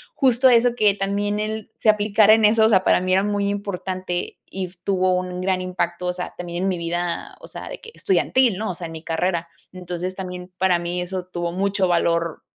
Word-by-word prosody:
justo 260 -1 +4
eso, 240 0 +4
que 210 -4 +3
también 205 +1 -1
él 215 0 -4
se 220 - +3
aplicara 210 0 +5
en 220 -1 +4
eso, 220 +1 +5
o - - +4
sea, 190 -4 +4
para - - +4
mí 185 0 0
era 190 +1 +4
muy 205 -1 0
importante 185 -3 -4
y 185 -1 -5
tuvo 185 -1 +2
un 180 0 -3
gran 185 0 0
impacto, 180 -1 -2
o 180 - 0
sea, 180 0 -6
también 175 0 -4
en 195 - +1
mi 180 -2 -2
vida, 170 +1 -3
o - - -11
sea, - - -8
de - - -7
que 455 - -12
estudiantil, 260 - +2
¿no?, 215 -1 -2
o - - -4
sea, 170 0 -6
en 165 - -9
mi 160 0 -8
carrera, 170 +1 -1 0.2
entonces, 180 0 -5
también 180 -1 -7
para 185 -2 +2
mí 175 +1 -3
eso 180 0 -4
tuvo 175 -1 -3
mucho 195 +1 0
valor 170 -2 +1
185 Hz, 220 wpm, -22 LUFS, 175-205 Hz, 0.2 s, aplicara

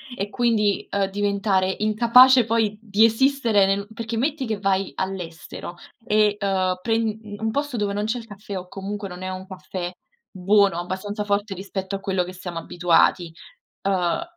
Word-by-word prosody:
e 200 -1 -3
quindi, 215 -4 +1
uhm, 200 -1 +1
diventare 200 -1 0
incapace 235 +3 +6
poi 220 -2 0
di 215 0 +4
esistere 230 -3 +3
nel 200 +1 0
perché, 230 0 -5
metti 275 +1 -1
che 215 -3 -3
vai 195 -1 0
all'estero 175 -2 -6 0.3
e, 210 -2 +3
uhm, 185 -2 0
pren 225 -1 0 0.2
un 220 +1 -1
posto 285 -2 -2
dove 205 -2 -1
non 205 +1 -1
c'è 230 +3 -1
il 225 - -12
caffè, 205 -1 -7
o 180 0 -7
comunque 200 +2 -5
non 180 0 -9
è 185 - -3
un 185 0 -6
caffè 185 -1 -6 0.4
buono, 195 -1 +3
abbastanza 205 +4 -4
forte 205 0 -1
rispetto 190 +1 -5
a - - -4
quello 190 -2 -1
che 180 - -8
siamo 175 -2 -6
abituati, 175 0 +2 0.5
uhm, 185 - +1
200 Hz, 165 wpm, -23 LUFS, 190-220 Hz, 0.5 s, incapace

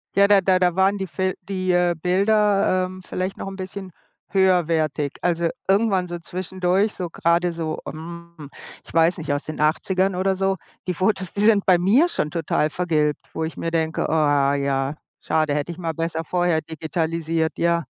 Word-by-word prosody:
Ja, 200 +1 +6
da 205 -1 +6
da 185 0 +3
da 180 -2 +2
waren 190 +2 +3
die 190 -1 -4
Fil 185 +2 -1
die, 185 -1 -2
äh, 175 -1 +2
Bilder, 195 0 +2
ähm, 185 0 -9
vielleicht 185 +1 -3
noch - - -6
‘n 195 - -9
bisschen 190 0 -7 0.4
höherwertig. 165 -6 +1
Also, 170 -1 +1 0.2
irgendwann 195 -2 +2
so 175 0 -5
zwischendurch, 185 +3 -1
so 180 -2 -5
grade 170 +2 +1
so, 160 -2 -4
ähm, 170 -1 -9 0.4
ich - - -15
weiß 165 +3 +3
nicht, 155 -4 -2
aus 145 - -2
den 155 - -7
80ern 185 +5 +1
oder 190 +1 +1
so, 195 0 +1 0.3
die 180 - 0
Fotos, 185 0 -1
die 205 - -2
sind 210 -2 +4
bei 185 -2 +5
mir 210 - +4
schon 150 - -2
total 160 -2 0
vergilbt, 155 -3 0
wo 160 - -3
ich 160 - -5
mir 165 - -2
denke, 160 -1 0
ah 145 -3 +2
ja, 140 0 -1 0.2
schade, 155 -2 0
hätte 150 +3 -2
ich - - -15
mal 165 -3 -3
besser 165 0 -3
vorher 175 -1 +1
digitalisiert, 160 0 -2
ja. 170 0 +1
175 Hz, 185 wpm, -22 LUFS, 160-190 Hz, 0.4 s, Ja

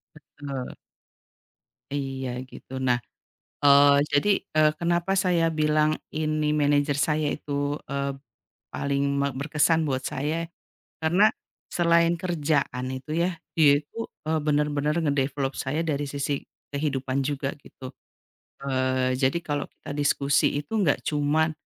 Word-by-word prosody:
Betul. 140 -3 -7 1.2
Iya 135 -2 -3 0.2
gitu. 130 - -14
Nah, 125 -2 +2 0.7
eee, 140 0 +7 0.2
jadi, 145 +8 +3 0.3
eee, 155 0 +5
kenapa 175 +2 +1
saya 170 -2 +2
bilang, 155 0 +2 0.2
ini 155 -1 0
manajer 145 -1 +2
saya 150 +1 +1
itu, 145 0 -2
eee, 140 0 -1 0.6
paling 140 0 -1 0.2
me 140 - +2
berkesan 155 +3 +1
buat 130 -1 -2
saya, 155 +5 -2 0.6
karena 180 +7 +4 0.4
selain 170 0 +3
kerjaan 150 -7 -1
itu 130 +3 -7
ya, 180 - +2 0.2
dia 155 -3 +6
itu, 145 - -19 0.3
eee, 160 0 +1
benar-benar 150 0 +1
nge-develop 140 -2 0
saya 145 +5 -1
dari 145 -2 -1
sisi 140 0 -2 0.3
kehidupan 140 -2 -1
juga 140 0 -2
gitu. 130 0 -11 0.7
Eee, 130 -1 +1
jadi 135 +4 +2
kalau 145 -1 -2
kita - - -11
diskusi 140 -1 +2
itu 150 - -10
enggak 160 -8 +2
cuma 155 +2 +1
145 Hz, 120 wpm, -26 LUFS, 140-155 Hz, 1.2 s, eee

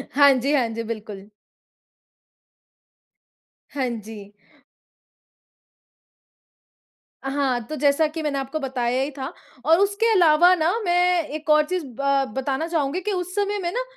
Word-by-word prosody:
हाँ 285 -1 +7
जी, 270 +3 0
हाँ 255 -5 +2
जी, 230 0 -5
बिल्कुल। 215 -3 -7 2.4
हाँ 260 -3 -1
जी। 215 -3 -8 2.9
हाँ, 270 -2 0
तो 310 - -5
जैसा 290 +2 +2
कि 315 +1 -6
मैंने 280 -2 -1
आपको 270 +3 -4
बताया 255 -2 -1
ही 280 - -2
था 275 +3 -7 0.3
और 325 +3 +5
उसके 405 +3 +2
अलावा 350 -1 +5
ना 330 +2 +1
मैं 355 -1 +2
एक 310 +1 -7
और 305 0 +5
चीज़ 360 -1 -3 0.2
ब 275 -1 +2
बताना 275 +4 -2
चाहूँगी 315 -1 -1
कि 420 - -2
उस 365 -1 -3
समय 410 0 -1
में 345 -2 -2
ना - - -2
290 Hz, 135 wpm, -23 LUFS, 265-350 Hz, 2.9 s, हाँ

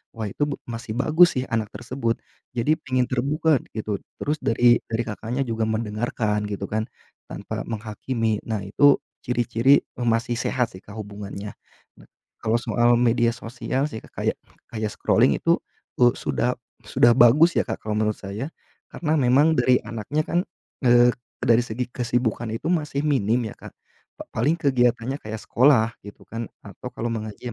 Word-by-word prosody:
wah 110 -2 -3
itu 100 - -2
be 140 - -2
masih 115 0 -6
bagus 160 +4 +5
sih - - -1
anak 110 -3 -2
tersebut, 115 -1 -3 0.4
jadi 125 +6 +2
pengen 130 -2 +1
terbuka 140 +4 +1 0.2
gitu, 105 -2 -2 0.2
terus 150 - 0
dari 120 +1 +4
dari 115 +1 0
Kakaknya 115 +5 -3
juga 115 -1 -1
mendengarkan 110 -1 -1
gitu 100 -1 -4
kan, 110 +1 -1 0.5
tanpa - - -5
menghakimi, 110 0 -2
nah 110 -2 -2
itu 140 +9 +4 0.2
ciri-ciri 120 +3 +3 0.2
masih 120 0 0
sehat 125 0 0
sih 95 - -12
Kak 100 - -12
hubungannya. 100 0 -7 0.4
Nah - - -18 0.4
kalau 115 +1 +2
soal 120 0 +3
media 120 -1 +3
sosial 125 +3 -2
sih 110 -7 -7
Kak - - -16
kayak - - 0 0.3
kayak 110 -2 -3
scrolling - - +2
itu - - +3 0.4
u 120 0 +6
sudah 125 +1 -1 0.3
sudah 110 +2 +4
bagus 140 +8 +6
ya - - +3
Kak, - - -3
kalau 105 -1 -2
menurut 110 -1 0
saya. 105 +8 -5 0.4
Karena 155 -2 -1
memang 145 +3 +4
dari 125 -1 +4
anaknya 120 +7 -3
kan, 170 - +1 0.4
eee, 120 0 +6 0.3
dari 120 +1 +3
segi 120 +2 -4
kesibukan 120 -2 -1
itu 115 +7 -4
masih 150 -3 -1
minim 120 -5 +2
ya - - -9
Kak. - - -12 0.5
Pa - - -5
paling 145 +9 +1
kegiatannya 125 -2 +1
kayak 110 0 -6
sekolah 120 -3 +3
gitu 105 - -12
kan, 115 0 -5 0.2
atau - - -8
kalau 120 - -4
mengaji 110 -2 -5
120 Hz, 160 wpm, -24 LUFS, 110-130 Hz, 0.5 s, u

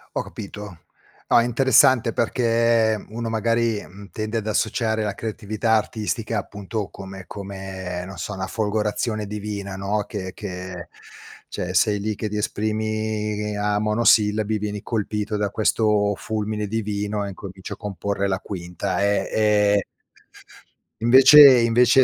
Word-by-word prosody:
Ho - - 0
capito. 100 -3 -9 0.5
Ah, - - +5
è - - 0
interessante 130 0 +4
perché 115 -2 +2
uno, 115 +1 -4
magari, 115 -1 0
mhmm, 100 +1 -13
tende 110 +4 -3
ad 110 - -7
associare 110 0 0
la 105 -1 -2
creatività 110 0 -3
artistica, 110 0 -3
appunto, 105 0 -5
come 95 0 -9
come, 95 -2 -6
non 95 0 -9
so, 105 - -5
una 95 -1 -4
folgorazione 110 0 -1
divina, 100 -1 -5
no, 100 +2 -1
che 95 -3 -6
che 90 -3 -7 0.6
cioè 90 - -4
sei 105 +1 +2
lì 105 +1 -2
che 110 - -4
ti 105 - -5
esprimi 105 0 -2
a 105 0 0
monosillabi, 105 -1 +3
vieni 105 -1 -4
colpito 105 -1 -2
da 105 -1 0
questo 105 -1 +1
fulmine 105 -1 -3
divino 105 -1 -2
e 100 - -4
incomincio 95 -1 -8
a - - -30
comporre 100 -1 -3
la 95 -1 -1
quinta, 90 -1 -4
ehm, 100 -1 +1
e 105 -2 +3 1.2
invece 135 +2 +9
invece 120 +2 +5
105 Hz, 135 wpm, -23 LUFS, 100-110 Hz, 1.2 s, invece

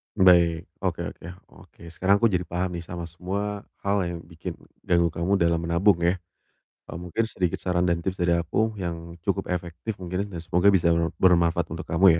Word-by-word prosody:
Baik, 85 -3 +5 0.2
oke - - -2
oke - - -15 0.3
oke. - - -17
Sekarang 95 +4 +3
aku 115 -2 +4
jadi 90 -1 0
paham 90 0 -2
nih 85 - -9
sama 85 0 -6
semua 100 +4 -4 0.2
hal 100 +1 +2
yang 85 -1 -4
bikin 85 +1 -7 0.3
ganggu 85 -1 +3
kamu 85 +4 0
dalam 85 -3 +2
menabung 85 +3 +3
ya. 85 +2 +2 0.7
Eee, 75 - -6
mungkin 90 +6 -2
sedikit 90 -5 -1
saran 90 -1 +1
dan 85 -1 +1
tips 95 +2 -3
dari 85 -1 +2
aku 85 +7 0
yang 85 -1 -5
cukup - - -1
efektif 90 +4 -4
mungkin 90 +2 -2
ya, - - -8
dan - - -5
semoga 90 +4 +3
bisa 90 -3 +3
e 85 - +3 0.2
bermanfaat 85 -2 +4
untuk 85 +3 -5
kamu 85 +3 +3
85 Hz, 190 wpm, -25 LUFS, 85-95 Hz, 0.7 s, Baik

